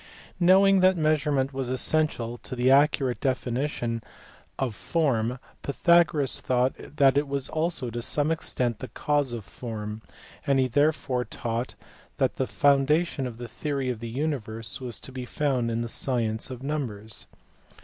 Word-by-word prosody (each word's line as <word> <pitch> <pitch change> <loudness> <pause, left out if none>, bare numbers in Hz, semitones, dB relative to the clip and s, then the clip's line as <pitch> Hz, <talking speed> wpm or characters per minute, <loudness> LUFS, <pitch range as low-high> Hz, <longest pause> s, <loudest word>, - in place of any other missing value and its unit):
Knowing 190 +2 +6
that 185 0 +4
measurement 150 -3 +1
was 130 -2 -3
essential 130 -3 +1
to 130 - -7
the 125 +1 +3
accurate 140 -2 +3
definition 125 -2 -1 0.6
of 130 -4 -1
form 125 -3 0 0.2
Pythagoras 155 -2 +3
thought 125 +1 +1
that 140 -2 +3
it 145 - -3
was 140 -1 -1
also 160 -6 -1
to 120 +1 -4
some 145 +5 +1
extent 125 -8 0
the 130 - -6
cause 145 +3 0
of 115 -4 -5
form, 105 0 -6 0.5
and 140 -1 +3
he 130 -1 +3
therefore 140 -1 +1
taught 120 0 -4 0.4
that - - +1
the - - 0
foundation 145 +1 +2
of 115 -2 -8
the 120 0 -6
theory 135 +2 -2
of 120 - -5
the 115 0 -6
universe 115 -4 -4
was 125 -2 -5
to - - -10
be 130 -1 -6
found 125 -2 0
in 115 0 -1
the 120 - -2
science 115 -2 -1
of 130 0 -7
numbers. 115 -8 -4
130 Hz, 155 wpm, -26 LUFS, 120-150 Hz, 0.6 s, Knowing